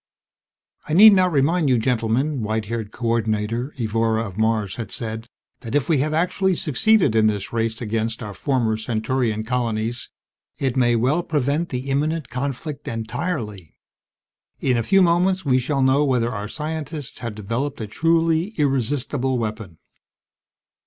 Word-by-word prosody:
"I - - -1
need 210 +5 +9
not 185 -2 +3
remind 155 +2 +2
you, 125 - +4
gentlemen," 125 +4 0
white 110 0 -1
haired 110 -1 -4
Co 120 - -7
ordinator 115 +3 -1
Evora 115 0 0
of 95 -4 -8
Mars 110 -2 0
had 115 -5 -5
said, 110 0 -5 0.3
"that 115 +4 -5
if 145 - +1
we 155 -5 +2
have 150 +3 0
actually 180 +4 +1
succeeded 160 - +2
in 110 -1 +4
this 105 0 -2
race 115 -1 -1
against 115 +1 -2
our 105 -1 -6
former 120 -3 0
Centaurian 110 0 -1
colonies, 115 -1 -2 0.5
it 135 -2 -1
may 120 -2 +3
well 130 +9 +2
prevent 150 +1 -1
the 130 +1 -4
imminent 155 +2 -1
conflict 140 +3 -4
entirely. 115 - -4 0.8
In 130 - +1
a 115 - +1
few 195 - +4
moments 180 +1 +2
we 130 -2 +3
shall 135 +2 0
know 135 +2 +4
whether 125 -4 +1
our 105 -2 -4
scientists 150 +1 -5
have 115 -3 -5
developed 115 +7 -3
a 110 - -3
truly 165 - +1
irresistible 135 -1 0
weapon." 110 -6 -5
125 Hz, 150 wpm, -22 LUFS, 110-150 Hz, 0.8 s, need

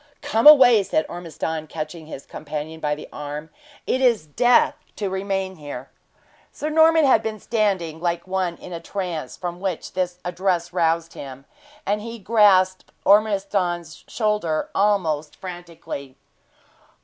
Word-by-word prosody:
"Come 285 -3 +3
away!" 255 -7 +9
said 160 -4 0
Ormiston, 160 -2 -5
catching 155 +1 -6
his 140 - -9
companion 155 +1 -6
by 150 -1 -1
the 150 - -10
arm. 150 +2 -6 0.3
"It 260 - 0
is 235 -10 +3
death 240 +11 +3 0.2
to 200 -3 -3
remain 190 -1 -2
here!" 145 -4 -8 0.6
Sir 305 - -4
Norman 320 0 +5
had 260 -5 +5
been 220 -1 -4
standing 195 -9 -1
like 170 -1 -1
one 185 -2 -1
in 180 - -10
a 170 - -4
trance, 165 -8 -5
from 175 -1 -5
which 185 -3 -4
this 180 -1 -2
address 175 -1 -1
roused 165 -1 +1
him, 135 0 -9 0.4
and 205 +1 0
he 230 +2 -7
grasped 195 -3 +3
Ormiston's 195 -5 +1
shoulder 210 -8 -1
almost 180 -7 +1
frantically. 170 -7 -8
180 Hz, 135 wpm, -23 LUFS, 160-210 Hz, 0.6 s, away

